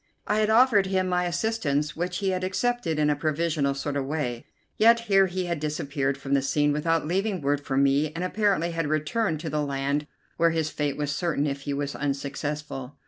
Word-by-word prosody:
I 210 - +1
had 215 0 +2
offered 220 -4 +5
him 190 -1 +1
my 180 0 +1
assistance, 170 -6 -1
which 175 +2 -2
he 195 -1 0
had 185 -1 -1
accepted 190 -3 -1
in 150 -1 +3
a - - +1
provisional 155 -1 0
sort 140 +1 -3
of 140 - 0
way, 130 -6 -3 0.3
yet 230 +1 +5
here 195 -4 +4
he 185 0 -3
had 170 -3 -2
disappeared 140 -2 -2
from 135 0 -4
the 140 - +4
scene 145 +2 +1
without 165 +2 +1
leaving 190 +4 0
word 145 0 0
for 135 -2 -3
me, 140 +2 +3
and 165 +3 -4
apparently 185 -3 +1
had 165 -2 -2
returned 155 +4 0
to 160 - -4
the 150 0 0
land 140 +1 -1 0.3
where 170 0 +4
his 160 -2 -1
fate 145 -2 -2
was 145 -1 -1
certain 165 -4 0
if 140 -1 -3
he 145 - -3
was 145 0 -3
unsuccessful. 140 -1 -4
155 Hz, 205 wpm, -26 LUFS, 145-185 Hz, 0.3 s, offered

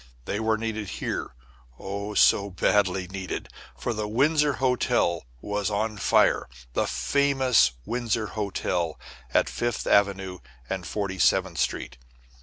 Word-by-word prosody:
They 100 - -2
were 110 0 +1
needed 110 -2 -3
here, - - -4 0.4
oh, 100 +4 -5
so 100 0 +5
badly 95 0 +1
needed; 95 0 -5 0.3
for 120 - -2
the 105 -1 -3
Windsor 145 +6 +3
Hotel 125 - +1
was 105 0 -1
on 105 +1 -1
fire - - +3 0.2
the - - +1
famous 135 - +3
Windsor 115 -1 -1
Hotel 90 -5 -2 0.3
at - - +3
Fifth 120 -1 -2
Avenue 95 -2 +2 0.3
and 90 +1 -4
Forty 95 -2 -3
seventh 95 -3 +2
Street. - - -2
105 Hz, 125 wpm, -26 LUFS, 95-115 Hz, 0.4 s, so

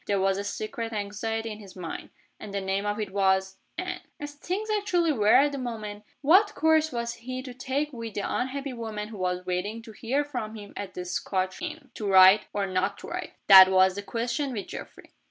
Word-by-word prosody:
There 200 -1 +1
was 195 0 +1
a - - -2
secret 225 +3 -4
anxiety 225 +2 -3
in 210 - -8
his 200 -3 -13
mind. 175 -3 -6 0.3
And 210 - -8
the 200 - -2
name 195 +1 -1
of 205 +1 -1
it 210 -3 -3
was 190 -1 +1 0.2
Anne. 360 -1 -4 0.2
As 290 0 -6
things 370 +8 -4
actually 360 -6 +2
were 215 -7 0
at 285 +2 +5
that 280 - -4
moment, 215 -4 -6 0.2
what 380 +9 +5
course 315 0 +3
was 235 -1 -2
he 255 +2 -6
to 255 -2 -8
take 275 +4 -2
with 230 -3 -7
the 205 - -1
unhappy 270 +5 -2
woman 220 -3 -5
who 215 -3 -9
was 180 0 -1
waiting 195 +5 -3
to 225 - -11
hear 260 +7 -1
from 240 -6 -5
him 205 -2 -10
at 200 -2 -6
the 180 - -5
Scotch 185 - -2
inn? 315 -3 -6
To 210 - -4
write? 190 +2 +7
or 200 -1 -1
not 195 +1 -1
to - - -8
write? - - -5
That 190 -1 +10
was 190 0 +5
the 205 - -5
question 235 +6 -2
with 205 -4 -5
Geoffrey. - - -9
215 Hz, 215 wpm, -27 LUFS, 195-265 Hz, 0.3 s, That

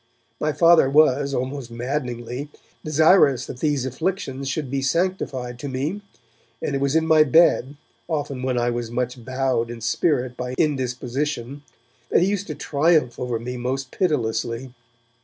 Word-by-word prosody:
My 155 - 0
Father 165 -3 +5
was, 140 -1 +4
almost 130 -1 -3
maddeningly, 125 +1 -4 0.3
desirous 155 -4 +4
that 125 - -8
these 145 -3 0
afflictions 135 -1 -3
should 135 -2 -3
be 135 -1 -1
sanctified 135 -6 -1
to 140 - -5
me, 145 +10 -3 0.6
and - - -3
it 135 - -1
was 140 +2 +1
in 160 0 +3
my 160 -1 +5
bed, 145 -2 +4 0.3
often 145 -5 -3
when 130 -1 -1
I 120 0 +1
was 120 -1 -3
much 125 0 -3
bowed 130 -2 -1
in 120 -1 -7
spirit 125 +2 0
by 125 0 -4
indisposition, 135 -1 -2 0.5
that - - +4
he 190 - +2
used 200 -1 -2
to 155 - -5
triumph 150 -5 +1
over 125 -2 -2
me 125 +2 -5
most 130 +2 -3
pitilessly. 120 -6 -1
135 Hz, 155 wpm, -23 LUFS, 125-150 Hz, 0.6 s, Father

